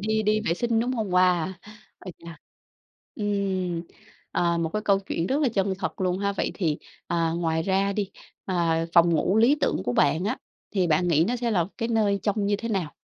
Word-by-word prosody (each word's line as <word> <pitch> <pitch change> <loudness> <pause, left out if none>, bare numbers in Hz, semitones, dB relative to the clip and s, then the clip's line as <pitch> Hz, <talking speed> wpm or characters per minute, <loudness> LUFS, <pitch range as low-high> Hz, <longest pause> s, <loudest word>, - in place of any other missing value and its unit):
đi 220 +1 0
đi 215 0 +2
vệ 170 -6 0
sinh, 230 +2 0
đúng 245 +2 -1
hông? 220 -6 -2
Wow! 180 -1 +3 0.5
Ái 185 - -9
chà. 170 -1 -11 0.8
Ừm. 190 -4 -1 0.5
Ờ, 170 -1 +1
một 165 -1 -1
cái 215 - -2
câu 200 -2 +3
chuyện 175 -3 -3
rất 275 +8 0
là 290 - +3
chân 195 -4 0
thật - - -4
luôn 185 -1 0
ha. 200 0 0
Vậy 200 - -1
thì, 160 -6 -1 0.3
à, 165 -1 0
ngoài 160 -1 0
ra 195 +2 +1
đi, 200 -1 -2 0.3
à, 165 -3 0
phòng 170 0 +6
ngủ 185 +5 +1
lý 235 +6 +5
tưởng - - 0
của 125 - 0
bạn 155 +7 +2
á 215 - -1 0.3
thì 190 -4 +1
bạn 170 +2 +2
nghĩ 160 -1 +4
nó 245 - 0
sẽ 240 -1 -1
là 175 -6 +1
cái 230 - -1
nơi 215 -3 +2
trông 205 -1 0
như 205 0 +2
thế 230 +3 -5
nào? 190 -8 -1
190 Hz, 215 wpm, -25 LUFS, 170-215 Hz, 0.8 s, phòng